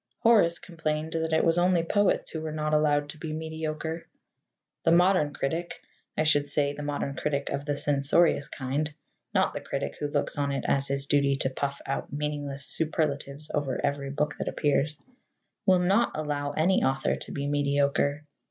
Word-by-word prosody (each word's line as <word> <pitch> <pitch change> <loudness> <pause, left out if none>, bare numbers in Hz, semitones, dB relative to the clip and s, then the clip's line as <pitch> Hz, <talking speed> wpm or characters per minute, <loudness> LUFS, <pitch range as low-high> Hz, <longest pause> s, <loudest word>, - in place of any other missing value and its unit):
Horace 210 -8 +5
complained 155 -2 -3
that 160 0 -1
it 160 - +3
was 165 +1 +3
only 175 -1 +3
poets 205 +4 +1
who 160 - -4
were 155 -1 -4
not 155 0 -2
allowed 145 -1 +3
to 155 - -9
be 155 -1 -4
mediocre. 160 +1 -4 0.7
The 165 - +3
modern 175 -3 +4
critic 165 +5 -3 0.4
I - - +3
should 145 -2 +3
say 145 0 0
the 150 - -7
modern 145 -1 -3
critic 140 -2 -2
of 140 +1 -3
the 145 -1 -1
censorious 145 +2 +3
kind, 140 +3 -2 0.4
not - - +2
the - - -4
critic 70 0 -4
who 145 - -1
looks 145 0 -1
on 140 -1 0
it 140 - -3
as 140 0 +2
his 140 0 -2
duty 140 -1 +3
to 135 -1 -1
puff 140 +1 -3
out 135 - -3
meaningless 145 -1 -2
superlatives 150 -2 0
over 140 -4 -1
every 140 -1 -2
book 150 +2 -1
that - - -3
appears 150 +1 +1 0.7
will 185 -1 +6
not 195 +7 +2
allow 145 -2 -2
any 175 +5 +2
author 135 0 +1
to - - -8
be 140 - -3
mediocre. 145 0 +1
150 Hz, 180 wpm, -27 LUFS, 140-160 Hz, 0.7 s, will